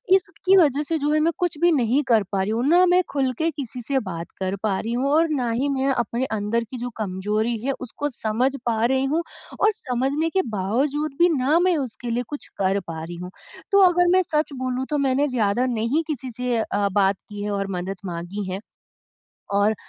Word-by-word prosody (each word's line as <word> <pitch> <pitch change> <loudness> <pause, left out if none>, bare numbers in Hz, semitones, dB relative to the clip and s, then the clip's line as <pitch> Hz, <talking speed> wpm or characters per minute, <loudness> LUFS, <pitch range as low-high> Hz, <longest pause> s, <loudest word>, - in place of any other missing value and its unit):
इसकी 385 0 +2
वजह 295 -5 +4
से 325 +2 -1
जो 295 +1 0
है 310 - +3
मैं 325 +2 +3
कुछ 350 -4 -1
भी 345 - +5
नहीं 265 -1 +2
कर 225 -4 +4
पा 195 -1 +1
रही 195 - -1
हूँ, 235 +3 0
ना 355 +3 +6
मैं 360 +1 +4
ख़ुल 270 -2 +1
के 325 +1 +1
किसी 255 -4 -6
से 270 +3 0
बात 170 -6 -6
कर 190 +1 -1
पा 200 -3 +1
रही 230 +2 -3
हूँ 260 +3 0
और 320 +2 +4
ना 255 -6 0
ही 255 +5 0
मैं 270 0 0
अपने 240 +1 -1
अंदर 210 +3 0
की 255 - -5
जो 245 +1 -4
कमज़ोरी 210 +3 -1
है 275 - +1
उसको 275 +4 -4
समझ 240 +1 0
पा 225 -2 +1
रही 265 +1 +2
हूँ 335 - +1 0.4
और 425 - +4
समझने 275 +5 -1
के 380 +3 +2 0.2
बावजूद 275 +10 0
भी 350 +1 +6
ना 285 +6 +3
मैं 355 -1 +3
उसके 235 +1 -7
लिए 245 +2 0
कुछ 290 - -7
कर 195 +1 +1
पा 160 -1 -5
रही 170 +2 -7
हूँ। 180 - -7 0.4
तो 400 0 +6
अगर 355 0 +3
मैं 370 - +5
सच 305 -2 -1
बोलूँ 255 0 -2
तो 295 - 0
मैंने 270 +3 +2
ज़्यादा 240 -2 +1
नहीं 245 +5 0
किसी 265 -5 -4
से 250 -1 0
अ, 205 -2 0
बात 195 0 +3
की 205 0 -6
है 210 - -2
और 195 -1 -1
मदद 190 +2 -4
माँगी 180 +3 -5
है 190 - -3 1.0
और 205 +2 +3
250 Hz, 220 wpm, -23 LUFS, 210-295 Hz, 1.0 s, ना